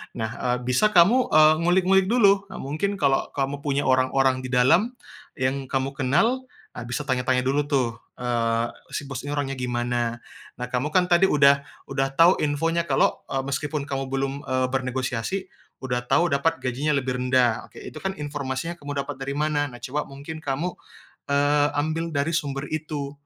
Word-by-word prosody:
Nah, 110 Hz, -1 st, -2 dB
eee, 125 Hz, -1 st, 0 dB
bisa 125 Hz, +12 st, +3 dB
kamu, 215 Hz, +10 st, +6 dB
eee, 155 Hz, 0 st, +7 dB
ngulik-ngulik 185 Hz, +2 st, +3 dB
dulu. 200 Hz, -4 st, +4 dB
Nah, 190 Hz, -, -10 dB
mungkin, 155 Hz, +9 st, -2 dB
kalau 140 Hz, -7 st, +1 dB
kamu 140 Hz, 0 st, -1 dB
punya 140 Hz, 0 st, -1 dB
orang-orang 130 Hz, 0 st, +2 dB
di 130 Hz, -, -6 dB
dalam 135 Hz, -, +3 dB, 0.4 s
yang 135 Hz, 0 st, -1 dB
kamu 135 Hz, +1 st, -1 dB
kenal, 170 Hz, -, +2 dB, 0.3 s
ah, 120 Hz, -, -8 dB
bisa 125 Hz, +5 st, -3 dB
tanya-tanya 130 Hz, -2 st, 0 dB
dulu 140 Hz, +3 st, 0 dB
tuh, 125 Hz, -6 st, 0 dB, 0.2 s
eee, 115 Hz, -1 st, 0 dB, 0.3 s
si -, -, -2 dB
bos 135 Hz, -, -4 dB
ini 145 Hz, -, -2 dB
orangnya 135 Hz, -2 st, -2 dB
gimana. 120 Hz, -1 st, -2 dB, 0.3 s
Nah, 125 Hz, -, -5 dB
kamu 125 Hz, +3 st, 0 dB
kan 180 Hz, -1 st, +3 dB
tadi 175 Hz, +2 st, +5 dB
udah 140 Hz, -2 st, +4 dB, 0.3 s
udah 135 Hz, 0 st, +1 dB
tau 170 Hz, +4 st, +5 dB
infonya 165 Hz, +3 st, 0 dB
kalau, 135 Hz, -, +2 dB
eee, 135 Hz, 0 st, -2 dB
meskipun 145 Hz, +2 st, -2 dB
kamu 135 Hz, -1 st, -3 dB
belum, 135 Hz, 0 st, -1 dB
eee, 130 Hz, 0 st, +1 dB
bernegosiasi, 130 Hz, +6 st, -2 dB, 0.3 s
udah 125 Hz, -1 st, -2 dB
tau 175 Hz, +6 st, +3 dB
dapat 160 Hz, +4 st, 0 dB
gajinya 140 Hz, +4 st, 0 dB
lebih 130 Hz, -2 st, -1 dB
rendah. 125 Hz, -2 st, +2 dB
Oke, -, -, -13 dB
itu -, -, -9 dB
kan 190 Hz, 0 st, -3 dB
informasi 145 Hz, 0 st, -4 dB
yang 170 Hz, -, -9 dB
kamu 145 Hz, -1 st, -3 dB
dapat -, -, -7 dB
dari 135 Hz, +1 st, -4 dB
mana? 150 Hz, 0 st, 0 dB
Nah, 120 Hz, -3 st, -11 dB
coba 145 Hz, +4 st, -3 dB
mungkin 140 Hz, +4 st, -8 dB
kamu, 145 Hz, +4 st, -2 dB, 0.6 s
eee, 145 Hz, +1 st, +3 dB
ambil 160 Hz, +3 st, -1 dB
dari 140 Hz, +3 st, 0 dB
sumber 140 Hz, -3 st, -2 dB
itu, 150 Hz, -3 st, -4 dB
140 Hz, 175 wpm, -24 LUFS, 130-155 Hz, 0.6 s, eee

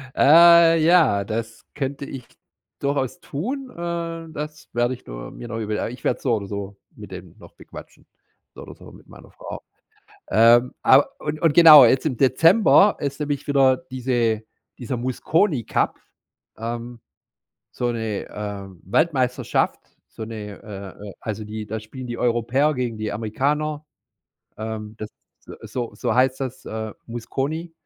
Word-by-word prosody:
Äh, 165 Hz, +2 st, +7 dB
ja, 160 Hz, -, +4 dB
das 110 Hz, +2 st, -5 dB
könnte 140 Hz, 0 st, -4 dB
ich 130 Hz, -3 st, -9 dB, 0.5 s
durchaus 140 Hz, +3 st, -2 dB
tun. 255 Hz, -, -5 dB
Ähm, 170 Hz, -1 st, -5 dB
das 150 Hz, 0 st, -7 dB
werde 120 Hz, +1 st, +1 dB
ich 125 Hz, -, -12 dB
nur -, -, -8 dB
mir 120 Hz, -, -9 dB
noch 115 Hz, -1 st, -5 dB
überl 105 Hz, -1 st, -3 dB
ah, -, -, -2 dB
ich 125 Hz, +2 st, -11 dB
werde -, -, -1 dB
so 125 Hz, -, +1 dB
oder 100 Hz, -2 st, -5 dB
so 100 Hz, 0 st, -6 dB, 0.2 s
mit -, -, -12 dB
dem -, -, -10 dB
noch -, -, -15 dB
bequatschen, -, -, -13 dB, 0.5 s
so -, -, -11 dB
oder -, -, -11 dB
so -, -, -14 dB
mit -, -, -17 dB
meiner -, -, -15 dB
Frau. -, -, -9 dB, 0.7 s
Ähm, 120 Hz, +3 st, +5 dB
aber 135 Hz, +2 st, +5 dB
und 150 Hz, 0 st, -4 dB
und 165 Hz, -3 st, +3 dB
genau, 155 Hz, -5 st, +10 dB
jetzt 130 Hz, +5 st, +3 dB
im 135 Hz, -5 st, -1 dB
Dezember 180 Hz, -, +5 dB
ist 140 Hz, 0 st, -4 dB
nämlich 145 Hz, -1 st, -3 dB
wieder 135 Hz, -2 st, +4 dB
diese 120 Hz, -4 st, 0 dB, 0.4 s
dieser 125 Hz, +1 st, -4 dB
„Mosconi 130 Hz, -, 0 dB
Cup,“ -, -, -1 dB, 0.6 s
ähm, 120 Hz, +1 st, -6 dB, 0.7 s
so 120 Hz, -1 st, -2 dB
'ne, 110 Hz, -3 st, -4 dB
ähm, 100 Hz, -3 st, -7 dB
Weltmeisterschaft, 130 Hz, -, 0 dB, 0.3 s
so -, -, -9 dB
'ne, 105 Hz, -2 st, -8 dB
äh 100 Hz, 0 st, -9 dB
äh, -, -, -10 dB
also, 110 Hz, 0 st, -5 dB
die 105 Hz, 0 st, -6 dB
da 110 Hz, +1 st, -5 dB
spielen 125 Hz, +4 st, -9 dB
die 120 Hz, 0 st, -5 dB
Europäer 125 Hz, +5 st, +1 dB
gegen 125 Hz, -4 st, -3 dB
die 110 Hz, 0 st, -3 dB
Amerikaner. 145 Hz, +8 st, -2 dB, 0.7 s
Ähm, 110 Hz, -1 st, -6 dB
das 110 Hz, 0 st, -7 dB, 0.5 s
ist -, -, -12 dB
so 120 Hz, -2 st, -3 dB
so -, -, -2 dB
heißt 130 Hz, +1 st, +2 dB
das, 130 Hz, -1 st, -5 dB
äh, 110 Hz, -1 st, -5 dB
Mosconi, 140 Hz, +8 st, -4 dB
125 Hz, 155 wpm, -22 LUFS, 110-150 Hz, 0.7 s, genau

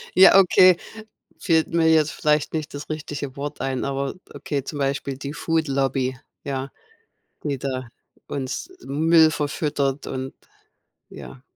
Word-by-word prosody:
Ja, 190 Hz, +1 st, +8 dB
okay, 185 Hz, -1 st, +7 dB, 0.6 s
fällt 160 Hz, -4 st, +2 dB
mir 165 Hz, -1 st, +4 dB
jetzt 160 Hz, -1 st, +3 dB
vielleicht 150 Hz, -1 st, 0 dB
nicht 155 Hz, -2 st, -4 dB
das 145 Hz, +1 st, -7 dB
richtige 145 Hz, -3 st, -5 dB
Wort 145 Hz, +1 st, -5 dB
ein, 135 Hz, -1 st, -2 dB
aber 140 Hz, 0 st, -2 dB, 0.2 s
okay, 140 Hz, -3 st, -3 dB
zum 145 Hz, +2 st, -6 dB
Beispiel 135 Hz, -1 st, -2 dB
die 140 Hz, +1 st, -6 dB
Food 160 Hz, +1 st, -1 dB
Lobby, 135 Hz, -1 st, 0 dB, 0.3 s
ja, 135 Hz, -1 st, -3 dB, 0.7 s
die 140 Hz, -4 st, -2 dB
da 130 Hz, -2 st, -4 dB, 0.4 s
uns 135 Hz, -, -4 dB
Müll 160 Hz, +3 st, +4 dB
verfüttert 145 Hz, -2 st, -2 dB
und 130 Hz, 0 st, -5 dB, 0.8 s
ja. 130 Hz, -, -11 dB
145 Hz, 135 wpm, -23 LUFS, 135-155 Hz, 0.8 s, Ja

